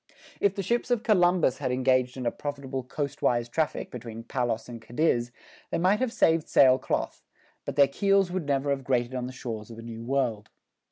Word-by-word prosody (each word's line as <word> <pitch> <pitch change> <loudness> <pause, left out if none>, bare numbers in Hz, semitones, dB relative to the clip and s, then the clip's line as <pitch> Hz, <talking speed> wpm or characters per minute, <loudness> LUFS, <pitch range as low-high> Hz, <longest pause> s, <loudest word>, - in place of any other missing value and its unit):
If 200 -1 +2
the 195 - -2
ships 240 +6 0
of 240 -2 +1
Columbus 175 - +3
had 130 -3 -1
engaged 130 0 +1
in 125 - -4
a 120 - +1
profitable 140 -2 -5
coastwise 125 -3 -1
traffic 155 +5 -2
between 115 -2 -8
Palos 120 -2 -2
and 120 -2 -8
Cadiz 120 0 0 0.4
they - - -1
might 185 +5 +3
have 255 -2 0
saved 165 -7 +2
sail 130 -1 +6
cloth, - - -2 0.4
but - - -4
their 140 -1 +6
keels 195 +5 +2
would 180 -5 -3
never 140 0 +1
have 135 -1 -1
grated 125 -1 0
on 125 -1 -3
the - - -6
shores 115 -4 -6
of 115 - -10
a 115 - -9
New 115 -1 -7
World. 120 -4 -1
130 Hz, 200 wpm, -27 LUFS, 120-165 Hz, 0.4 s, sail